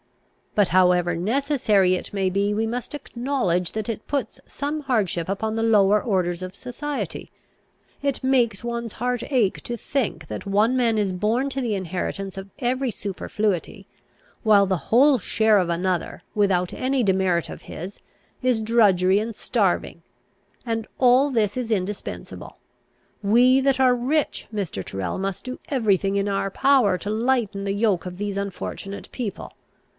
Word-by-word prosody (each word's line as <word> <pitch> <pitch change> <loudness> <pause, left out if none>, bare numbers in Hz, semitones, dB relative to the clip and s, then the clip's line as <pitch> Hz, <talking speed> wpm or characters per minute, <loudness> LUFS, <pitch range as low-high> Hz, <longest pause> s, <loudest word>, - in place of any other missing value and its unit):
But, 205 -3 +3
however 180 -1 +3
necessary 215 - +2
it 185 - -3
may 195 -2 0
be, 200 +2 0
we 220 +2 0
must 240 +4 -4
acknowledge 240 - -1
that 215 -1 -3
it 225 -2 -4
puts 275 -6 -2
some 295 +2 -3
hardship 205 - 0
upon 220 +3 -2
the 225 - 0
lower 210 -2 +4
orders 180 -5 0
of 185 +1 -6
society. 280 +5 -5 0.7
It 280 -2 -1
makes 245 -5 +2
one's 235 -2 -4
heart 245 0 -2
ache 235 -8 +2
to 240 - -5
think, 215 - -2
that 105 - -6
one 210 +5 +3
man 235 -3 +2
is 200 -3 0
born 220 +9 0
to 270 +1 -2
the 230 -4 -1
inheritance 190 +1 -4
of 195 0 -8
every 255 0 0
superfluity, 200 -1 -3 0.6
while 210 -3 +6
the 190 -1 +1
whole 265 +3 +5
share 220 +2 +3
of 180 -2 0
another, 175 0 -1
without 190 -4 +2
any 260 +1 0
demerit 190 -4 +1
of - - -9
his, 185 +5 -8 0.4
is 250 -3 +1
drudgery 200 -4 +4
and 220 +1 -4
starving; - - 0 0.6
and 225 -1 -1
that - - -29
all 255 +3 +5
this 215 -6 +1
is 245 -3 -3
indispensable. 200 -1 -4 0.7
We 250 +6 +5
that 270 -1 +2
are 255 -1 +5
rich, 280 +5 -1
Mr. 180 - -3
Tyrrel, 95 -2 -4
must 195 +3 -4
do 255 0 -6
every 225 -8 +3
thing 195 +1 -1
in 200 0 0
our 195 0 0
power 240 -4 +3
to 200 - -6
lighten 220 -3 0
the 200 - -1
yoke 200 -4 +1
of 180 -1 -6
these 205 0 -3
unfortunate 200 0 -5
people. 215 -6 -5
210 Hz, 160 wpm, -23 LUFS, 190-245 Hz, 0.7 s, while